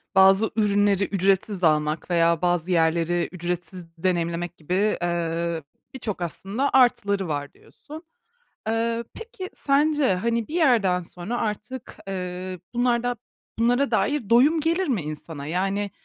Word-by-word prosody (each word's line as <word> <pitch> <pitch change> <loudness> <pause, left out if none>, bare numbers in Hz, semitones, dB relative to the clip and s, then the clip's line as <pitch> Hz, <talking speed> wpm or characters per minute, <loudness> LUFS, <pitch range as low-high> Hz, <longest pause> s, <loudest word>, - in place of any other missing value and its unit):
bazı 195 +3 +6
ürünleri 205 -2 +2
ücretsiz 195 0 0
almak 155 +1 +1
veya 170 0 +3
bazı 175 0 +1
yerleri 170 +1 +1
ücretsiz 175 0 -5
deneyimlemek 175 0 -1
gibi, 185 +7 0
eee, 170 -1 -1 0.3
birçok 215 -8 -5
aslında 195 - -2
artıları 200 -7 +3
var 145 -2 -3
diyorsun. 310 +3 -13 0.6
Eee, 230 +1 0
peki 455 -5 -8
sence, 290 -4 +2
hani, 230 +4 -1
bir 320 - -6
yerden 220 - +3
sonra 180 +7 -5
artık, 225 +5 -5
eee, 185 -1 -5
bunlarda 245 0 +1 0.4
bunlara 245 +4 +2
dair 285 -8 0
doyum 285 +8 +5
gelir 335 +3 0
mi 230 - 0
insana? 150 -1 -7
Yani, 195 +4 -1
195 Hz, 125 wpm, -24 LUFS, 175-235 Hz, 0.6 s, bazı